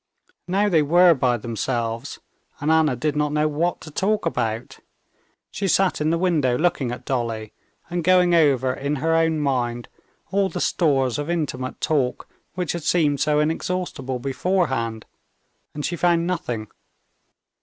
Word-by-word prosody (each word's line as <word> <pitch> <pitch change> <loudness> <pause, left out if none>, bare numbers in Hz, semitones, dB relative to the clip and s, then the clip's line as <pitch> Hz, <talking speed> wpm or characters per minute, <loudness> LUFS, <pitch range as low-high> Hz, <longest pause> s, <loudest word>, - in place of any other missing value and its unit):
Now 195 +3 +2
they 170 -6 +3
were 175 +4 +5
by 125 -4 +1
themselves, 115 0 -3 0.4
and 150 +3 0
Anna 160 -4 +3
did 150 +4 -1
not 150 0 0
know 150 +1 +1
what 160 +4 -1
to 155 - -10
talk 205 +6 0
about. 115 -8 -2 0.7
She 200 - -2
sat 190 -2 +2
in 155 - +1
the 165 - +1
window 155 -9 +1
looking 155 -7 0
at 120 - -7
Dolly, 115 -4 -3 0.3
and 175 0 -3
going 180 0 +4
over 135 -6 +3
in 140 +3 -2
her 160 +3 0
own 165 -1 +2
mind 120 -4 -1 0.4
all 195 0 +2
the - - -5
stores 135 -6 +1
of 145 +2 -4
intimate 135 -7 -3
talk 135 -5 0 0.3
which 180 -3 -2
had 170 - -4
seemed 150 -3 +2
so 150 +1 +2
inexhaustible 155 -4 -2
beforehand, 130 -5 -1 0.7
and 150 - -3
she 175 - -2
found 170 -1 +2
nothing. 145 - -3
150 Hz, 155 wpm, -23 LUFS, 130-175 Hz, 0.7 s, were